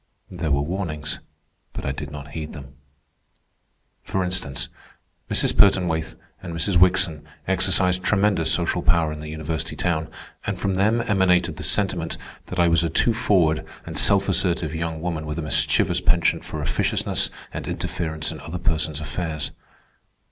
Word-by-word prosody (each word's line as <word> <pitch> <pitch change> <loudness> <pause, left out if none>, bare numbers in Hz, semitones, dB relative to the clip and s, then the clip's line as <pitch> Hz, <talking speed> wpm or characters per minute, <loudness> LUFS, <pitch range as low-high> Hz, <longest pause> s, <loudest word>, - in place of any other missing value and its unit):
There 80 -3 -3
were 70 0 +2
warnings, 75 -3 -3 0.5
but - - -6
I 70 - 0
did 70 - -6
not 75 0 -9
heed 80 -1 -6
them. 70 -3 -10 1.3
For 95 - -2
instance, 90 -6 -2 0.6
Mrs. - - +2
Pertonwaithe 90 -5 +3 0.3
and 85 -3 -6
Mrs. 85 +4 0
Wickson 90 -3 +4 0.2
exercised 95 -1 +3
tremendous 95 -6 +2
social 90 0 +1
power 85 -3 +2
in 75 - -6
the 75 0 -7
university 80 0 -4
town, 80 -3 -1 0.4
and - - -1
from 100 - 0
them 105 +5 +2
emanated 90 -4 +2
the - - -7
sentiment 90 -5 0 0.3
that 90 - -5
I 85 - +5
was 85 0 +3
a 85 - 0
too 115 +8 +3
forward 90 -9 +2 0.2
and - - -7
self 100 -1 +5
assertive 85 -4 0
young 80 -1 -3
woman 80 -3 -3
with 75 +1 -4
a 85 - -3
mischievous 75 - +3
penchant - - +2
for - - -5
officiousness - - +1 0.2
and - - -5
interference 80 -2 -2
in - - -8
other 85 +2 -6
persons' 80 -3 -1
affairs. 80 -1 -3
85 Hz, 155 wpm, -23 LUFS, 80-95 Hz, 1.3 s, I